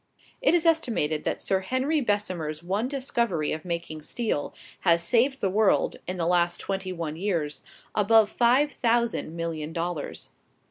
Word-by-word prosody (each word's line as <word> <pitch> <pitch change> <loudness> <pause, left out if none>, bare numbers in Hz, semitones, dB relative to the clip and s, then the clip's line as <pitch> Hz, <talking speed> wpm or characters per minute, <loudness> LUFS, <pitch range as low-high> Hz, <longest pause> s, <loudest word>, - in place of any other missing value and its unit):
It - - +4
is 340 -1 +2
estimated 230 - +1
that - - -1
Sir 190 - +1
Henry 260 +10 0
Bessemer's 180 - -2
one 200 +7 -1
discovery 235 - -1
of 155 - -3
making 170 -3 -4
steel 210 -3 -2 0.3
has 170 -2 +3
saved 250 +7 +2
the - - +2
world, 210 0 +2
in 185 +1 -3
the 170 - -1
last 175 0 +2
twenty 190 -1 -3
one 165 -4 -4
years, 165 -6 -2 0.3
above 215 +1 +5
five 255 +5 +3
thousand 235 - 0
million 165 -2 -4
dollars. 170 -2 -4
190 Hz, 150 wpm, -26 LUFS, 165-235 Hz, 0.3 s, above